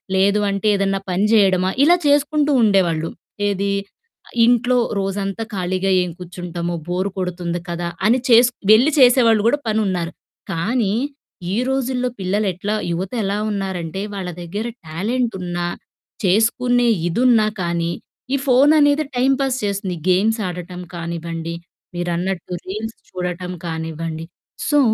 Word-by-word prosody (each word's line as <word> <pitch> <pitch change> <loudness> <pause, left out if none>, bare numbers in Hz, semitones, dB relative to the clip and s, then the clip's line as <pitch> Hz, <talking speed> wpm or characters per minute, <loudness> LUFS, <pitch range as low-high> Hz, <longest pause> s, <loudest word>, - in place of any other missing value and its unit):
లేదు 200 +2 +3
అంటే 200 +1 -1
ఏదన్నా 195 0 0
పని 185 +3 +1
జెయడమా, 190 -3 +4
ఇలా 340 +4 +6
చేసుకుంటూ 290 +1 +3
ఉండేవాళ్ళు. 175 -6 +2 0.4
ఏదీ? 200 0 -1 0.8
"ఇంట్లో 245 +1 +3 0.2
రోజంతా 195 +2 -2
ఖాళీగా 185 0 -1
ఏం 180 - -3
కూర్చుంటాము, 175 -1 -5
బోరు 185 +3 -1
కొడుతుంది 175 -1 -3
కదా!" 175 0 -3 0.2
అని 245 +4 +4
చేసుక్ 245 +1 +5 0.2
వెళ్ళి 250 +8 +5
చేసేవాళ్ళు 240 -4 +5
గూడా 290 +5 +2
పనున్నారు. 190 -6 0 0.4
కానీ, 200 +5 0 0.6
ఈ - - +1
రోజుల్లో 260 -1 0
పిల్లలెట్లా 195 +1 -1 0.2
యువతెలా 195 +4 -2
ఉన్నారంటే, 190 -2 -3
వాళ్ళ 190 -2 -4
దగ్గర 200 +6 -4 0.2
టాలెంటున్నా, 180 -1 -2 0.6
చేసుకునే 240 +5 +3 0.2
ఇదున్నా 230 +2 +4 0.2
కానీ 170 0 -1 0.4
ఈ - - +4
ఫోననేది 290 +3 +5
టైమ్ 260 +2 +3
పాస్ 270 -2 +1
చేస్తుంది. 200 -2 -2
గేమ్స్ 215 +5 +3
ఆడటం 180 0 -6
కానివ్వండి, 170 -1 -4 0.4
మీరన్నట్టు 175 +1 -2
రీల్స్ 215 +4 -5
చూడటం 180 0 -4
కానివ్వండి. 160 0 -4 0.4
సో, 295 - +4
195 Hz, 115 wpm, -20 LUFS, 175-230 Hz, 0.8 s, ఇలా